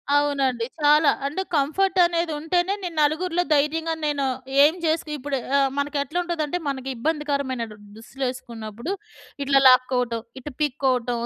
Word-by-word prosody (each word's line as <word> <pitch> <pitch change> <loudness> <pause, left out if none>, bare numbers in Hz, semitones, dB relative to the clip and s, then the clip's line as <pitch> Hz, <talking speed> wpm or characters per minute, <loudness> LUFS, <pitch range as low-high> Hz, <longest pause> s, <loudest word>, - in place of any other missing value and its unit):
అవునండి. 275 -5 +1 0.2
చాలా. 295 0 +5 0.2
And 295 +7 -2
comfort 365 +7 +1
అనేది 340 -1 0
ఉంటేనే 350 +5 0
నేను 350 -2 -5
నలుగురిలో 335 +4 +1
ధైర్యంగా 320 +3 +1
నేను 290 -2 0 0.4
ఏం 300 +3 +5
జేసికి 315 -1 0
ఇప్పుడు 275 0 -3 0.2
ఆహ్, 275 -1 +3
మనకెట్లుంటదంటే 305 +3 -1
మనకి 270 -1 -3
ఇబ్బందికరమైన 280 -2 -1
దు 210 - -12 0.2
దుస్తులేసుకున్నప్పుడు 235 - -6 0.5
ఇట్లా 275 0 +4
లాక్కోవటం! 250 -2 +3 0.2
ఇటు 295 +3 -8
పిక్కోవటం! 255 -4 0
290 Hz, 125 wpm, -23 LUFS, 260-320 Hz, 0.5 s, చాలా